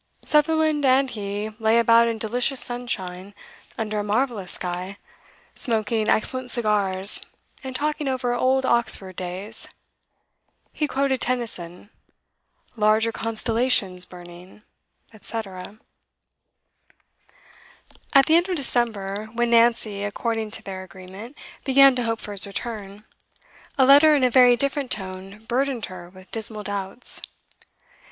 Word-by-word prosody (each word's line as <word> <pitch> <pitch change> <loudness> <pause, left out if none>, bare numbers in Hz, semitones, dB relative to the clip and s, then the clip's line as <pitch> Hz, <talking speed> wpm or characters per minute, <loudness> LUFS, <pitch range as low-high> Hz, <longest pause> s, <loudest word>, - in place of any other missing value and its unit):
Sutherland 310 0 +2
and 265 0 +3
he 205 0 -4
lay 220 +1 +3
about 230 0 +5
in 230 -1 -2
delicious 245 +4 -1
sunshine, 200 -6 -4 0.4
under 215 -2 -2
a - - -2
marvellous 210 -3 0
sky, 180 +2 -2 0.6
smoking 220 -2 -1
excellent 255 +3 0
cigars, 205 -4 +1 0.4
and 260 -1 -7
talking 300 +1 -2
over 255 -2 -1
old 260 +2 +1
Oxford 205 -6 0
days. 185 +5 -3 1.1
He 300 - -1
quoted 270 -1 0
Tennyson: 210 -6 -4 0.8
'Larger 215 +1 +2
constellations 225 -4 0
burning,' 180 +3 -13 0.6
&c. 230 - -3
At 195 -2 -7 2.5
the 315 - +4
end 345 +3 +3
of 365 - 0
December, 215 - -1
when 240 0 0
Nancy, 230 -3 +3
according 220 +1 -2
to 220 +1 -2
their 190 -2 -6
agreement, 190 +7 -11 0.3
began 275 0 +6
to 245 - -1
hope 225 -1 -1
for 210 - -8
his 200 -1 +5
return, 205 -1 -6 0.7
a 265 - +5
letter 290 +3 +7
in 275 - +1
a 250 - +3
very 250 -1 +6
different 280 +1 0
tone 195 +1 -4
burdened 255 -1 -1
her 175 -1 -10
with 185 0 -17
dismal 220 -1 -4
doubts. 200 +4 -5
225 Hz, 120 wpm, -23 LUFS, 200-255 Hz, 2.5 s, letter